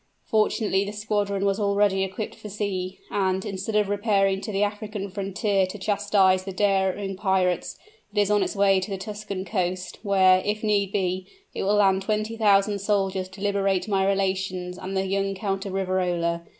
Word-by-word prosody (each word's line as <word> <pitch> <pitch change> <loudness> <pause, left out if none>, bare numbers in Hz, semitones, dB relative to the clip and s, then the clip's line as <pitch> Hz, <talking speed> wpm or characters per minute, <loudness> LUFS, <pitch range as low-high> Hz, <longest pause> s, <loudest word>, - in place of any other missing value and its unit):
Fortunately 215 -2 +1
the 200 +1 -5
squadron 205 -2 -1
was 195 +1 +1
already 200 -1 +2
equipped 195 +3 -4
for 210 - -10
sea; 190 -2 -3
and, 190 -1 0
instead 200 +1 -4
of 210 -1 +3
repairing 200 -2 +1
to 215 +2 -5
the 200 0 +1
African 205 -1 -4
frontier 195 0 0
to 185 - -7
chastise 200 -2 +2
the 195 - -5
daring 195 0 0
pirates, 185 -2 0 0.3
it 205 - -1
is 205 0 +2
on 205 -1 +3
its - - -1
way 195 -1 +4
to 190 - -5
the 195 - -3
Tuscan 200 -1 -5
coast, 185 -3 -2
where, 190 -3 +5
if 210 +1 -2
need 200 -2 +1
be, 185 -2 -1 0.3
it - - -4
will 200 +2 +2
land 195 -2 +4
twenty 215 +2 -1
thousand 205 -2 +3
soldiers 195 -2 0
to 190 +1 -12
liberate 195 -2 +1
my 195 -2 +1
relations 190 -2 -1
and 190 +1 -4
the 190 - 0
young 195 0 -1
Count 195 0 -3
of 190 - -5
Riverola. 180 -3 0
195 Hz, 180 wpm, -25 LUFS, 190-205 Hz, 0.3 s, where